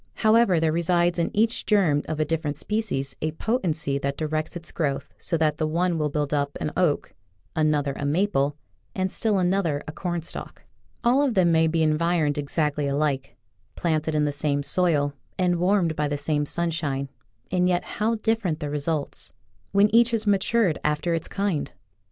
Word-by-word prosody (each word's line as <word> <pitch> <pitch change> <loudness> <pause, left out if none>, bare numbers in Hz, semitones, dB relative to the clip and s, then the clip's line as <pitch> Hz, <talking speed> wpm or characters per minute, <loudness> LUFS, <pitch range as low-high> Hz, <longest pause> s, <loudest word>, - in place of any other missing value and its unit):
However, 215 -5 +4
there 160 -1 +2
resides 170 +1 +1
in 170 - +1
each 225 +3 +1
germ 175 -9 +3
of 155 - -3
a 155 - +2
different 150 -2 -2
species 180 -12 -2
a 155 0 -1
potency 160 - -1
that 140 0 -2
directs 155 +2 -2
its 170 0 -5
growth 145 -5 -2
so 170 - 0
that 155 -1 +1
the 155 - +1
one 170 +1 0
will 150 -1 0
build 145 0 -2
up 140 -1 -1
an 150 - -2
oak, 170 -6 +1 0.4
another 150 -3 +1
a - - -5
maple, 145 -2 +1 0.4
and 185 -1 -1
still 215 -3 +1
another 180 -5 +1
a - - -4
cornstalk. 175 0 -5 0.4
All 245 +4 +4
of 270 -5 +1
them 180 -3 +4
may 160 0 +4
be 160 0 +1
environed 155 -1 +1
ex 145 +2 -6
actly 150 -2 +1
alike, 140 -1 -1 0.4
planted 160 -2 0
in 150 -1 +2
the 145 - 0
same 145 0 -1
soil 145 -4 +1 0.2
and 180 -1 +2
warmed 180 -2 +2
by 150 0 0
the 145 0 -2
same 145 0 0
sunshine, 155 -5 -2 0.4
and 180 0 +2
yet 175 -1 +1
how 220 +2 -1
different 215 -7 0
the 150 -3 -4
results 150 0 -3 0.2
— - - -39
when 200 +1 +4
each 235 +1 +6
has 230 -2 -1
matured 205 -2 +2
after 150 +3 0
its 165 -1 -2
kind! 195 -7 -2
160 Hz, 180 wpm, -25 LUFS, 150-185 Hz, 0.4 s, each